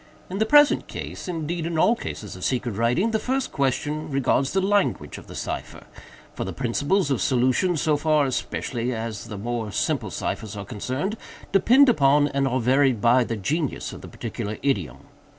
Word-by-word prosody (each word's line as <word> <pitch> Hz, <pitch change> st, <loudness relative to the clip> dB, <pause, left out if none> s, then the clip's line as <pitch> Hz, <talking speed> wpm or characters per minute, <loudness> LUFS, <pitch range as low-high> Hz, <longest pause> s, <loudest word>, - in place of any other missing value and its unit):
"In 195 Hz, -, -3 dB
the 220 Hz, -, +2 dB
present 295 Hz, +3 st, +5 dB
case—indeed 165 Hz, -1 st, -4 dB
in 170 Hz, -1 st, -2 dB
all 220 Hz, +9 st, +4 dB
cases 105 Hz, -, -7 dB
of 90 Hz, -, -9 dB
secret 125 Hz, -2 st, 0 dB
writing—the 125 Hz, -, +1 dB
first 265 Hz, +3 st, -1 dB
question 145 Hz, +3 st, -1 dB
regards 135 Hz, 0 st, +1 dB
the 190 Hz, -, +1 dB
language 200 Hz, +1 st, 0 dB
of -, -, -15 dB
the -, -, -10 dB
cipher; -, -, -5 dB, 0.5 s
for -, -, -4 dB
the -, -, -4 dB
principles 145 Hz, +7 st, 0 dB
of 130 Hz, -, 0 dB
solution, 130 Hz, +7 st, +2 dB
so 155 Hz, -1 st, +2 dB
far, 155 Hz, -1 st, +2 dB
especially, 125 Hz, -1 st, -2 dB
as 110 Hz, -1 st, -5 dB
the 105 Hz, -, -7 dB
more 115 Hz, 0 st, -3 dB
simple -, -, -1 dB
ciphers 105 Hz, -1 st, -4 dB
are 100 Hz, -, -6 dB
concerned, 130 Hz, -, -3 dB, 0.3 s
depend 245 Hz, +8 st, +6 dB
upon, 145 Hz, -, +4 dB
and 140 Hz, -1 st, 0 dB
are 130 Hz, 0 st, 0 dB
varied 130 Hz, 0 st, +3 dB
by, 120 Hz, +3 st, +4 dB
the 115 Hz, -1 st, -3 dB
genius 145 Hz, -, -2 dB
of -, -, -9 dB
the -, -, -9 dB
particular 105 Hz, +1 st, -5 dB
idiom. 85 Hz, -, -1 dB
135 Hz, 175 wpm, -24 LUFS, 120-170 Hz, 0.5 s, depend